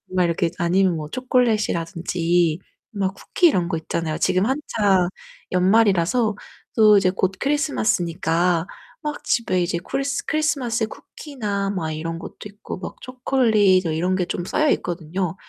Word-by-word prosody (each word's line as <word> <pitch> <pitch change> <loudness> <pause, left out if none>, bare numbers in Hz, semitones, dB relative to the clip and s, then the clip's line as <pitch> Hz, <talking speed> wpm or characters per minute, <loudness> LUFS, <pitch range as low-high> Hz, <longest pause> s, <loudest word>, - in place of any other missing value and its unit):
막 180 - +3
이렇게 170 0 +1
아니면 180 +1 +2
뭐 155 -1 -5
초콜릿이라든지 175 -8 0 0.3
막 195 -3 -1
쿠키 350 - +2
이런 180 - +1
거 170 - -2
있잖아요. 160 0 -3
지금 185 +2 +2
한창 210 -9 +1 0.4
연말이라서 200 +3 +3 0.4
또 215 -2 +6
이제 195 -2 +3
곧 190 0 0
크리스마스니까 175 - +1 0.4
막 300 -1 -5
집에 185 -6 +1
이제 170 0 -1
쿠리 275 +10 -3 0.2
크리스마스 265 -8 0
쿠키나 210 -7 -5
막 165 -5 -3
이런 165 +2 -4
것도 - - -9
있고 205 +1 -8
막 180 - -7
초콜릿 225 -8 +2
이런 165 +4 0
게 185 -1 0
좀 175 - -3
쌓여있거든요. 180 - -1
190 Hz, 315 characters per minute, -22 LUFS, 170-225 Hz, 0.4 s, 또